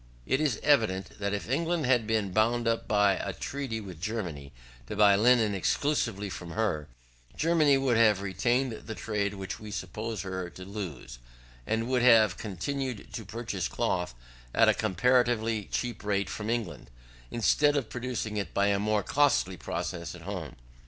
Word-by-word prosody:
], - - -27
it 135 - +1
is 140 -8 +1
evident, 110 -12 +2
that 100 0 -1
if 100 -1 -3
England 165 +4 0
had 125 -4 +3
been 110 -3 0
bound 115 +4 +2 0.2
by 105 -2 +3
a - - -3
treaty 135 -5 -4
with 95 -6 -9
Germany 85 -10 -4 0.4
to - - -5
buy 105 -1 +6
linen 110 0 +4
exclusively 105 -1 0
from 85 -3 -7
her, 100 -10 -1 0.5
Germany 155 -3 +4
would 130 -4 +2
have 110 -4 +5
retained 120 +7 +1
the 110 0 -7
trade 100 +1 -2
which 95 -1 -6
we 105 - -9
supposed 105 +3 -4
her 95 -2 -4
to 90 +1 -10
lose, 85 - -7 0.5
and 115 +1 0
would 130 -1 +1
have 115 -6 +6
continued 115 +4 -4
to 115 - -5
purchase 105 -3 -4
cloth 90 -8 -1 0.4
at - - +5
a - - +6
comparatively 115 +1 +1
cheap 120 -3 -3
rate 100 -2 0
from 105 +1 -4
England, 110 - -3 0.4
instead 145 +5 +3
of 135 -6 -1
producing 120 -3 -4
it 100 -5 -4
by 100 0 +3
a 100 -1 +2
more 105 0 +1
costly 145 -10 +2
process 85 0 -4
at 85 - -12
home. 90 -7 -6
110 Hz, 165 wpm, -29 LUFS, 95-120 Hz, 0.5 s, buy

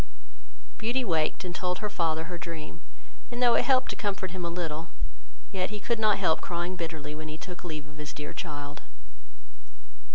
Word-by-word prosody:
Beauty 240 +4 +2
waked, 160 -1 +2
and 180 - -2
told 180 0 +1
her 210 - -1
father 165 -5 +2
her 175 +2 -4
dream, 165 -1 -5 0.5
and 240 0 -3
though 245 -1 +7
it - - +6
helped 260 -1 +5
to - - -3
comfort 195 -3 -1
him 185 -1 -3
a 170 - +1
little, 165 -2 -2 0.6
yet 185 -2 +1
he 210 0 -3
could 230 +3 +1
not 215 -2 +5
help 180 -5 +4
crying 175 +1 -1
bitterly, 160 -4 -3
when 155 +1 -5
he 155 0 -4
took 180 +2 -7
leave 155 -4 -4
of 145 +1 -12
his 150 0 -4
dear 150 0 -5
child. 145 -3 -4
175 Hz, 190 wpm, -30 LUFS, 155-200 Hz, 0.6 s, though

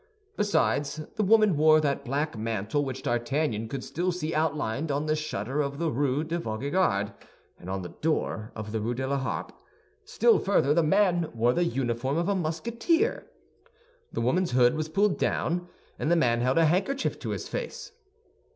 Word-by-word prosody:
Besides, 150 -7 +1
the 215 - +1
woman 215 -2 +5
wore 155 +1 +6
that 140 -3 0
black 145 +3 -2
mantle 110 +4 -1
which 135 -1 -5
D'Artagnan 120 -1 -1
could 130 +2 -5
still 180 +3 -1
see 170 -2 -3
outlined 150 -2 -1
on 145 +2 -1
the 155 0 +1
shutter 145 -2 -2
of 140 -1 -3
the 165 0 0
Rue 140 +3 0
de 165 +2 -2
Vaugirard 110 - 0 0.5
and 90 - -9
on 95 0 -3
the 90 - -6
door 130 -8 -1
of 110 -1 -6
the 110 - -1
Rue 120 +3 -2
de 130 +2 -2
la 140 +1 0
Harpe; 130 - -3 0.5
still 465 +1 +3
further, 150 -8 +2
the 170 - +4
man 175 0 +2
wore 120 +2 +3
the 175 +4 +1
uniform 130 -2 -1
of 170 +1 0
a 200 - +2
Musketeer. 230 - 0 0.8
The - - -3
woman's 170 +7 +1
hood 125 -1 +5
was 155 0 -3
pulled 200 +4 +1
down, 175 +2 0 0.3
and 150 - -1
the 170 - +4
man 120 -7 +2
held 130 +3 +1
a 165 - +5
handkerchief 200 - 0
to - - -5
his - - -4
face. - - -5
150 Hz, 180 wpm, -27 LUFS, 125-175 Hz, 0.8 s, wore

